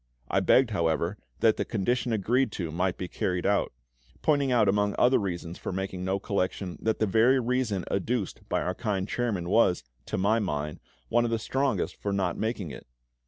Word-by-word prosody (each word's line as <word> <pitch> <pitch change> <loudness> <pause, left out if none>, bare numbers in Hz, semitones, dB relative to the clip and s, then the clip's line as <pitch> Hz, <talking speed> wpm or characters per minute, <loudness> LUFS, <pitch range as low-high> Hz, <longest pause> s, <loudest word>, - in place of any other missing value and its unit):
I - - +3
begged, 130 -3 +4
however, 85 +1 0 0.2
that 110 -1 +4
the - - 0
condition 120 +4 -1
agreed 115 +4 +1
to 85 -4 -3
might 90 +2 0
be 90 - -4
carried 90 +1 -2
out; 100 0 +2 0.5
pointing 145 -3 +2
out 115 -4 +4
among 105 +1 +2
other 125 +2 +5
reasons 85 -4 -4
for - - -4
making 95 -1 -3
no 95 +1 0
collection, 95 -3 -2
that 110 0 +1
the 110 - +2
very 115 +6 +4
reason 120 -6 0
adduced 100 +1 -2
by - - 0
our 90 - -1
kind 100 -3 -2
chairman 105 -9 -1
was, 90 - +3 0.2
to - - -2
my 105 +4 +3
mind, 75 -7 -3 0.3
one 120 +1 +3
of 120 - 0
the 115 - +1
strongest 135 +5 -1
for 100 - -3
not 95 -3 0
making 110 -7 -2
it. - - -10
100 Hz, 190 wpm, -28 LUFS, 90-115 Hz, 0.5 s, other